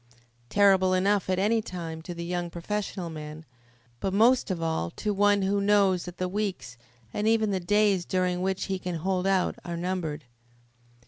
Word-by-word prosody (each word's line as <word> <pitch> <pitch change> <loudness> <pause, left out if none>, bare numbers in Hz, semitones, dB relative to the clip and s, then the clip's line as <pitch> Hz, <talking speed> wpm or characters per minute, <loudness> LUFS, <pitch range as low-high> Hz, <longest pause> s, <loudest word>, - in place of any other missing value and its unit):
Terrible 190 -2 +4
enough 195 +1 +1
at 185 - +1
any 215 +4 +2
time 165 -5 -6
to 175 +2 -7
the 170 0 -5
young 175 0 -2
professional 180 0 -4
man, 155 0 -8 0.5
but 195 0 -2
most 240 +4 +4
of 185 -3 -2
all 160 - -1
to 210 - -3
one 205 0 +3
who 200 +1 +1
knows 200 -3 +3
that 180 0 -9
the 185 - -1
weeks, 195 - -3 0.4
and 210 - -1
even 220 -2 +3
the 190 - 0
days 200 0 +2
during 180 0 0
which 190 +1 -1
he 190 -1 -2
can 180 -1 -4
hold 185 +3 -1
out 190 -2 +1
are 170 -1 -5
numbered. 170 -5 -3
185 Hz, 180 wpm, -27 LUFS, 175-200 Hz, 0.5 s, Terrible